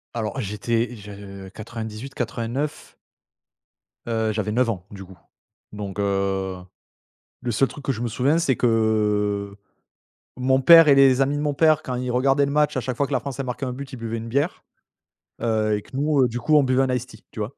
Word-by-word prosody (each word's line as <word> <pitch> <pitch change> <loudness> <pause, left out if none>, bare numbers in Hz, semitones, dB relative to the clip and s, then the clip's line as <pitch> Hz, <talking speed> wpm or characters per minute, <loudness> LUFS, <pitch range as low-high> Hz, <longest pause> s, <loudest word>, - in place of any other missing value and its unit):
Alors 115 +3 -3
j'étais 115 +3 -2
je 100 -2 -10
98-89? 115 +5 -5 1.1
Heu, 110 -1 0
j'avais 105 -1 -2
9 120 +2 +2
ans 95 -5 -4
du 100 -1 -9
coup. 95 0 -15 0.5
Donc 105 -1 -6
heu, 95 -1 -1 0.9
le 120 - -2
seul 130 +4 +2
truc 145 - -11
que 135 - 0
je 120 - -6
me 120 - -1
souviens 135 +8 +1
c'est 140 -7 +1
que, - - +1
heu, 105 -3 +1 0.8
mon 130 +1 +2
père 165 +3 +9
et 140 - +7
les 135 -1 +5
amis 140 +2 +1
de - - -2
mon 150 -1 0
père, 155 +1 +3
quand 125 - -4
ils 125 0 -3
regardaient 135 +3 +3
le 140 - -3
match, 150 -1 +2
à - - 0
chaque 125 +1 -3
fois 140 - +1
que - - -12
la 130 - +2
France 140 +1 -7
elle 135 - -2
marquait 125 +2 -4
un 125 - -3
but, 135 +1 -8
ils - - -6
buvaient 115 0 -4
une 115 0 -6
bière, 140 +8 -1 0.8
heu 110 -2 +1
et 105 - -5
que 130 - -11
nous 140 -2 +3
du 120 0 -4
coup 155 +5 +3
on 145 - +5
buvait 130 0 +2
un 130 -1 0
Ice 125 0 -3
Tea, 110 -4 -16
tu - - -8
vois? 105 +6 -4
120 Hz, 210 wpm, -23 LUFS, 105-135 Hz, 1.1 s, père